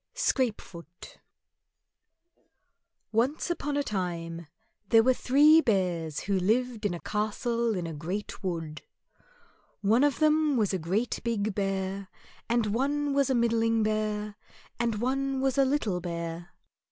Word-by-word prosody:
Scrapefoot 215 Hz, -, -3 dB, 1.9 s
Once 260 Hz, +10 st, 0 dB
upon 295 Hz, -4 st, -2 dB
a 285 Hz, -, +1 dB
time, 170 Hz, -, -4 dB, 0.4 s
there 225 Hz, -1 st, +6 dB
were 255 Hz, +2 st, +4 dB
three 295 Hz, +6 st, +5 dB
Bears 180 Hz, -, 0 dB
who 195 Hz, -1 st, 0 dB
lived 225 Hz, +3 st, 0 dB
in 175 Hz, -, -3 dB
a -, -, -7 dB
castle 225 Hz, +3 st, -1 dB
in 180 Hz, -2 st, -3 dB
a 165 Hz, -, -5 dB
great 180 Hz, +8 st, -5 dB
wood. 165 Hz, -4 st, -4 dB, 1.0 s
One 220 Hz, +6 st, +3 dB
of 290 Hz, -2 st, +2 dB
them 310 Hz, -2 st, +3 dB
was 210 Hz, -4 st, +1 dB
a 190 Hz, -, 0 dB
great 195 Hz, +9 st, -1 dB
big 215 Hz, -3 st, -1 dB
Bear, 195 Hz, 0 st, -2 dB, 0.4 s
and 230 Hz, -3 st, +1 dB
one 285 Hz, +4 st, 0 dB
was 275 Hz, -1 st, +2 dB
a 260 Hz, -, +2 dB
middling 230 Hz, -1 st, +2 dB
Bear, 215 Hz, -1 st, -2 dB, 0.4 s
and 235 Hz, -2 st, 0 dB
one 270 Hz, +2 st, -1 dB
was 270 Hz, 0 st, +1 dB
a 275 Hz, -, +5 dB
little 225 Hz, -10 st, 0 dB
Bear. 170 Hz, 0 st, -5 dB
215 Hz, 135 wpm, -28 LUFS, 185-260 Hz, 1.9 s, there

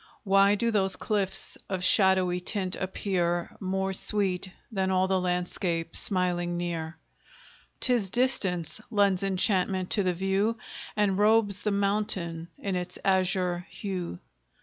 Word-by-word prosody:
Why 195 Hz, 0 st, +4 dB
do 230 Hz, +3 st, 0 dB
those 195 Hz, -3 st, +2 dB
cliffs 195 Hz, -2 st, -1 dB
of 185 Hz, -2 st, -2 dB
shadowy 185 Hz, -2 st, +4 dB
tint 185 Hz, 0 st, -1 dB
appear 175 Hz, -2 st, -2 dB
More 190 Hz, 0 st, -2 dB
sweet 190 Hz, -2 st, -1 dB, 0.2 s
than 190 Hz, -3 st, 0 dB
all 185 Hz, 0 st, +2 dB
the 190 Hz, -1 st, +1 dB
landscape 180 Hz, -2 st, -1 dB
smiling 175 Hz, -2 st, +1 dB
near? 170 Hz, -2 st, -4 dB, 0.8 s
'Tis 240 Hz, -6 st, +3 dB
distance 215 Hz, -, +1 dB
lends 200 Hz, -4 st, +2 dB
enchantment 190 Hz, -1 st, +1 dB
to 210 Hz, -, +2 dB
the 180 Hz, -2 st, 0 dB
view, 195 Hz, +5 st, 0 dB, 0.4 s
And 205 Hz, -2 st, +1 dB
robes 210 Hz, -2 st, +3 dB
the 210 Hz, -, -1 dB
mountain 200 Hz, -5 st, -1 dB
in 195 Hz, -2 st, -3 dB
its 180 Hz, 0 st, -3 dB
azure 185 Hz, -2 st, +1 dB
hue. 185 Hz, -, -5 dB
190 Hz, 125 wpm, -27 LUFS, 180-200 Hz, 0.8 s, Why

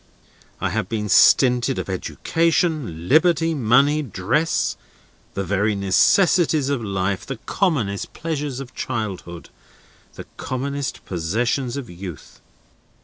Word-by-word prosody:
I -, -, -1 dB
have 90 Hz, -, -2 dB
been 105 Hz, -2 st, -3 dB
stinted 125 Hz, +5 st, +5 dB
of -, -, -4 dB
education, 150 Hz, -, -1 dB
liberty, 165 Hz, -, +3 dB
money, 140 Hz, +3 st, +3 dB
dress, 120 Hz, -, 0 dB, 0.6 s
the 100 Hz, -, -1 dB
very 105 Hz, +3 st, 0 dB
necessaries 155 Hz, -, +3 dB
of 140 Hz, -5 st, -1 dB
life, 95 Hz, -1 st, -2 dB
the 135 Hz, -, -6 dB
commonest 120 Hz, -, -1 dB
pleasures 150 Hz, -5 st, -4 dB
of 130 Hz, -2 st, -9 dB
childhood, 100 Hz, -8 st, -5 dB, 0.6 s
the -, -, -9 dB
commonest 140 Hz, +1 st, -4 dB
possessions 120 Hz, +9 st, -1 dB
of 135 Hz, -4 st, -6 dB
youth. 90 Hz, -4 st, -10 dB
125 Hz, 110 wpm, -22 LUFS, 100-150 Hz, 0.6 s, stinted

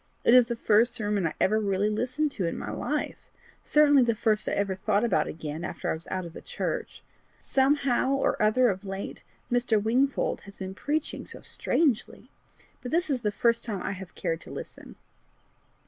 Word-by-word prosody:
It 235 Hz, -, +5 dB
is 250 Hz, -2 st, +7 dB
the 235 Hz, -, -2 dB
first 230 Hz, +2 st, +3 dB
sermon 205 Hz, -5 st, 0 dB
I 155 Hz, -, -5 dB
ever 215 Hz, +3 st, +3 dB
really 200 Hz, -1 st, +1 dB
listened 255 Hz, +7 st, 0 dB
to 190 Hz, -9 st, -2 dB
in -, -, -3 dB
my -, -, -5 dB
life -, -, -3 dB, 0.3 s
certainly 290 Hz, -2 st, +5 dB
the 235 Hz, -2 st, +2 dB
first 215 Hz, -1 st, +2 dB
I -, -, -2 dB
ever 200 Hz, -1 st, 0 dB
thought 200 Hz, +3 st, 0 dB
about 235 Hz, -, +2 dB
again 155 Hz, 0 st, -6 dB
after 185 Hz, -, -3 dB
I -, -, +1 dB
was 160 Hz, +1 st, -4 dB
out 185 Hz, -1 st, -3 dB
of 170 Hz, -, -9 dB
the -, -, -9 dB
church. 485 Hz, -1 st, -4 dB, 0.4 s
Somehow 275 Hz, -1 st, +2 dB
or 275 Hz, -, 0 dB
other 235 Hz, +4 st, +4 dB
of 190 Hz, 0 st, -3 dB
late 195 Hz, 0 st, -6 dB, 0.3 s
Mr. 240 Hz, -3 st, +2 dB
Wingfold 250 Hz, +6 st, +1 dB
has 200 Hz, -, -12 dB
been 190 Hz, 0 st, -6 dB
preaching 295 Hz, +9 st, -3 dB
so -, -, -9 dB
strangely! 270 Hz, -9 st, -1 dB, 0.5 s
but 250 Hz, -, -6 dB
this 340 Hz, +1 st, +1 dB
is 255 Hz, -3 st, 0 dB
the 210 Hz, -, 0 dB
first 235 Hz, +2 st, +1 dB
time 205 Hz, -5 st, -4 dB
I -, -, -2 dB
have 190 Hz, -2 st, -8 dB
cared 165 Hz, 0 st, -2 dB
to -, -, -10 dB
listen. -, -, -9 dB
220 Hz, 195 wpm, -27 LUFS, 195-255 Hz, 0.5 s, is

